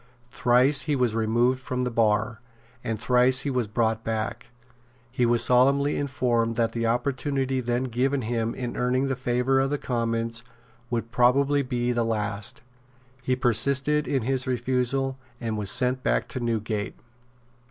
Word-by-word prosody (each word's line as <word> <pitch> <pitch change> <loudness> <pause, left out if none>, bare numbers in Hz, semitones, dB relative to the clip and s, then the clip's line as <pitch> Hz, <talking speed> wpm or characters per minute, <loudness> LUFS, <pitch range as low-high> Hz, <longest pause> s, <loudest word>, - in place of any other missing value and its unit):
Thrice 130 +4 +3
he 150 +1 0
was 125 -4 +1
removed 120 +3 +1
from 125 -1 -3
the 125 - -2
bar; 110 0 +1 0.4
and 110 -1 -3
thrice 125 +2 +3
he 145 - -2
was 125 -4 0
brought 110 +1 0
back. 115 +2 -3 0.6
He 125 -1 +1
was 120 0 +3
solemnly 140 +3 +3
informed 120 -5 0
that 115 -1 +1
the 115 -1 -1
opportunity 130 +2 -1
then 120 +1 -1
given 130 +2 0
him 115 0 -2
of 125 -2 -4
earning 130 +2 +1
the 135 - 0
favour 125 +1 +1
of 135 0 +1
the 145 - -1
Commons 115 -2 -2 0.5
would 115 -1 -3
probably 140 +4 +3
be 125 -2 -1
the 120 -1 +1
last. 105 -1 -3 0.6
He 130 0 0
persisted 140 +4 +1
in 135 -4 0
his 130 +1 0
refusal, 130 +2 -1 0.2
and 115 -2 -3
was 105 -2 -2
sent 125 +5 +2
back - - 0
to - - -5
Newgate. 110 -3 -2
125 Hz, 155 wpm, -25 LUFS, 115-130 Hz, 0.6 s, Thrice